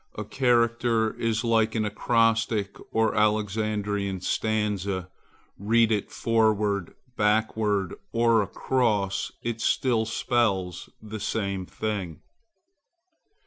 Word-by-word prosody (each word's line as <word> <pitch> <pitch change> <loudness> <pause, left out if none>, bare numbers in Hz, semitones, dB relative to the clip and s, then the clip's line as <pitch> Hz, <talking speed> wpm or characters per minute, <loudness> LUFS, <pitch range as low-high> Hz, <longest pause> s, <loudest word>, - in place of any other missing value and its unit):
A - - -5
character 115 -3 +2
is 110 -1 0
like 115 -1 +2
an 110 -1 +1
acrostic 110 -1 +1 0.2
or 110 -1 +2
Alexandrian 105 -2 0
stanza;—read 105 +2 -1
it 105 -2 -1
forward, 105 -4 +1 0.2
backward, 105 -3 +1 0.2
or 115 -1 +3
across, 105 -2 0
it 115 -1 -3
still 115 -2 +1
spells 105 -6 0
the 110 0 -6
same 100 -3 -2
thing. 95 -7 -4
110 Hz, 90 wpm, -26 LUFS, 100-115 Hz, 0.2 s, or